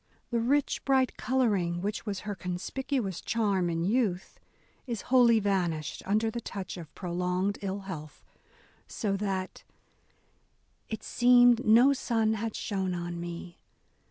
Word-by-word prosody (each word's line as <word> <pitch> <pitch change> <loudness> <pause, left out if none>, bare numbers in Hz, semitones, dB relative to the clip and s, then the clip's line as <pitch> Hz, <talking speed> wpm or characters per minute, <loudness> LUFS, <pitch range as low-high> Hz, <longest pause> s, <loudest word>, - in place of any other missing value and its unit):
The 235 - +1
rich, 275 +5 +1
bright 265 -2 +2
colouring 205 -10 +1
which 205 +4 -4
was 200 -2 -3
her 210 -1 -4
conspicuous 195 - -3
charm 200 -6 0
in 165 0 -1
youth, 195 -3 0 0.5
is 235 -4 -4
wholly 235 -3 +6
vanished 175 -7 -1
under 215 +3 +1
the 235 - -4
touch 195 -4 -6
of 165 -4 -9
prolonged 180 +2 -1
ill 200 0 -3
health: 160 -6 -8 0.6
so 205 -4 -2
that 190 -2 -3 0.6
— - - -42
It 220 - -5
seemed 245 0 +5
no 240 +6 +7
sun 225 -4 +1
had 220 0 -3
shone 190 -3 -2
on 175 0 -4
me. 170 0 -7
200 Hz, 135 wpm, -29 LUFS, 180-235 Hz, 0.6 s, no